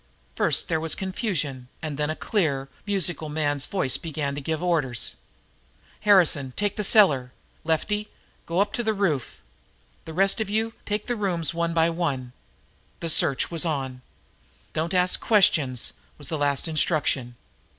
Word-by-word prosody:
First -, -, +2 dB
there 160 Hz, -3 st, 0 dB
was 160 Hz, -1 st, -1 dB
confusion, 170 Hz, -, -3 dB
and 155 Hz, -2 st, -4 dB
then 150 Hz, +1 st, -1 dB
a 155 Hz, -, -1 dB
clear, 140 Hz, -11 st, -1 dB, 0.2 s
musical 175 Hz, -5 st, 0 dB
man's 145 Hz, -2 st, 0 dB
voice 185 Hz, -10 st, +1 dB
began 150 Hz, -3 st, -3 dB
to 145 Hz, -, -5 dB
give 160 Hz, +4 st, -2 dB
orders: 130 Hz, -, 0 dB, 0.8 s
"Harrison, 165 Hz, -10 st, +4 dB
take 205 Hz, -1 st, 0 dB
the 210 Hz, -, -2 dB
cellar. 150 Hz, -, +5 dB, 0.3 s
Lefty, 210 Hz, +7 st, -1 dB, 0.4 s
go 170 Hz, +2 st, 0 dB
up 205 Hz, 0 st, 0 dB
to -, -, 0 dB
the 220 Hz, -1 st, 0 dB
roof. 165 Hz, -, -1 dB, 0.6 s
The 160 Hz, -, -7 dB
rest 195 Hz, +4 st, +3 dB
of 215 Hz, -, -2 dB
you 220 Hz, +2 st, 0 dB
take 210 Hz, 0 st, -1 dB
the 245 Hz, -, -1 dB
rooms 175 Hz, -7 st, -1 dB
one 170 Hz, 0 st, -1 dB
by 165 Hz, 0 st, +3 dB
one." 140 Hz, -8 st, -2 dB, 0.7 s
The 165 Hz, -, -2 dB
search 140 Hz, 0 st, +2 dB
was 165 Hz, -2 st, 0 dB
on. 135 Hz, -6 st, -3 dB, 0.7 s
"Don't 165 Hz, +4 st, -1 dB
ask 180 Hz, 0 st, +4 dB
questions," 165 Hz, -, +3 dB, 0.2 s
was 145 Hz, -2 st, -4 dB
the 160 Hz, -, -2 dB
last 145 Hz, +1 st, +1 dB
instruction. 150 Hz, -6 st, 0 dB
160 Hz, 155 wpm, -25 LUFS, 140-195 Hz, 0.8 s, cellar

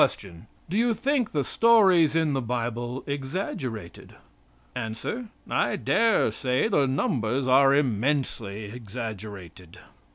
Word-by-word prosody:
Do 190 Hz, +6 st, -1 dB
you 235 Hz, -1 st, +2 dB
think 260 Hz, -2 st, 0 dB
the 145 Hz, -2 st, 0 dB
stories 190 Hz, -, +4 dB
in 160 Hz, -3 st, +2 dB
the 135 Hz, -, 0 dB
Bible 120 Hz, +1 st, -3 dB
exaggerated? 135 Hz, -, -5 dB, 0.6 s
A. 110 Hz, -, -3 dB, 0.6 s
"I -, -, 0 dB
dare 230 Hz, -1 st, +2 dB
say 130 Hz, +7 st, 0 dB
the 145 Hz, -11 st, +2 dB
numbers 130 Hz, -1 st, 0 dB
are 135 Hz, +1 st, +5 dB
immensely 120 Hz, -5 st, -1 dB
exaggerated." 105 Hz, -6 st, -8 dB
130 Hz, 105 wpm, -26 LUFS, 115-160 Hz, 0.6 s, are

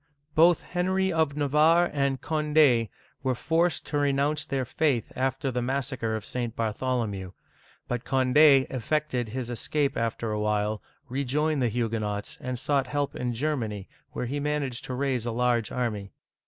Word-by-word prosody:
Both 170 Hz, +1 st, +5 dB
Henry 190 Hz, +1 st, 0 dB
of 160 Hz, -3 st, +1 dB
Navarre 155 Hz, +4 st, +4 dB
and 140 Hz, -2 st, 0 dB
Cond6 150 Hz, -7 st, +3 dB, 0.3 s
were 130 Hz, -1 st, 0 dB
forced 165 Hz, +5 st, +1 dB
to 145 Hz, -, -1 dB
re 145 Hz, -1 st, +2 dB
nounce 145 Hz, +2 st, +1 dB
their 135 Hz, -2 st, -1 dB
faith 130 Hz, -3 st, 0 dB
after 130 Hz, +1 st, -1 dB
the 125 Hz, 0 st, -1 dB
massacre 130 Hz, -3 st, -2 dB
of 110 Hz, -2 st, -5 dB
St. 120 Hz, -2 st, -3 dB
Bartholomew; 110 Hz, -4 st, -2 dB, 0.5 s
but 120 Hz, -1 st, -2 dB
Cond6 135 Hz, +1 st, +5 dB
effected 130 Hz, -2 st, -1 dB
his 125 Hz, +1 st, -4 dB
escape 140 Hz, +4 st, -1 dB
after 115 Hz, -1 st, -2 dB
a 105 Hz, -, -1 dB
while, 105 Hz, 0 st, 0 dB, 0.3 s
rejoined 140 Hz, +3 st, 0 dB
the 120 Hz, -, +2 dB
Huguenots, 110 Hz, -3 st, -2 dB
and 125 Hz, 0 st, -3 dB
sought 135 Hz, +1 st, 0 dB
help 145 Hz, +1 st, -2 dB
in 125 Hz, -1 st, -2 dB
Germany, 115 Hz, -8 st, -2 dB, 0.3 s
where -, -, -3 dB
he 140 Hz, +4 st, -2 dB
managed 145 Hz, -4 st, -2 dB
to 130 Hz, -, -4 dB
raise 130 Hz, -3 st, -1 dB
a -, -, 0 dB
large 120 Hz, -2 st, +1 dB
army. 105 Hz, -5 st, -3 dB
130 Hz, 155 wpm, -27 LUFS, 115-150 Hz, 0.5 s, Both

